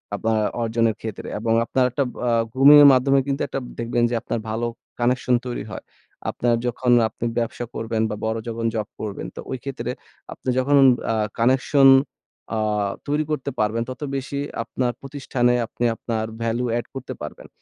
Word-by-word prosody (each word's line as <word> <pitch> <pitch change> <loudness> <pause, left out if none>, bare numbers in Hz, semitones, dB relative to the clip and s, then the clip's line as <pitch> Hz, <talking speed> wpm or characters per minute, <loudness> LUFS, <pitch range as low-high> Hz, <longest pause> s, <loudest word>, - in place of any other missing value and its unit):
আপনার 110 +1 0 0.2
অর্জনের 115 -1 +1
ক্ষেত্রে 110 -2 -6
এবং 115 +1 0
আপনার 130 +1 +2
একটা 140 - 0 0.2
আ 120 - +2 0.2
গ্রুমিং 140 +3 +8
এর 145 - +10
মাধ্যমে 135 +2 +4
কিন্তু 140 0 -1
একটা 135 - -3 0.2
দেখবেন 120 0 0
যে 120 - -1
আপনার 115 - -3
ভালো 115 +2 -1 0.3
কানেকশন 125 +1 +2
তৈরি 125 -1 -4
হয়। - - -7 0.5
আপনার 120 -1 +1
যখন 125 +1 0 0.2
আপনি 115 - -6
ব্যবসা 120 +1 -3
করবেন, 115 0 -2
বা 105 - -3
বড় 110 0 -1
যখন 115 0 -3
জব 110 -2 -2
করবেন। 105 -2 -5
তো - - -8
ওই 130 - -2
ক্ষেত্রে 125 -3 -4 0.4
আপনি - - -5
যখন 140 +3 +2 0.4
আ - - +1 0.2
কানেকশন 130 +3 +5 0.7
আ - - 0 0.5
তৈরি 150 +2 +1
করতে 140 -2 -2
পারবেন 110 +2 +1
তত 130 +1 -7
বেশি 140 +1 -3 0.2
আপনার 120 +1 -1
প্রতিষ্ঠানে 135 -3 0
আপনি 120 - -3
আপনার 110 -1 -3 0.2
ভ্যালু 115 +2 0
এড 120 - -3
করতে 135 -1 -5
পারবেন। - - -8
120 Hz, 170 wpm, -23 LUFS, 115-130 Hz, 0.7 s, এর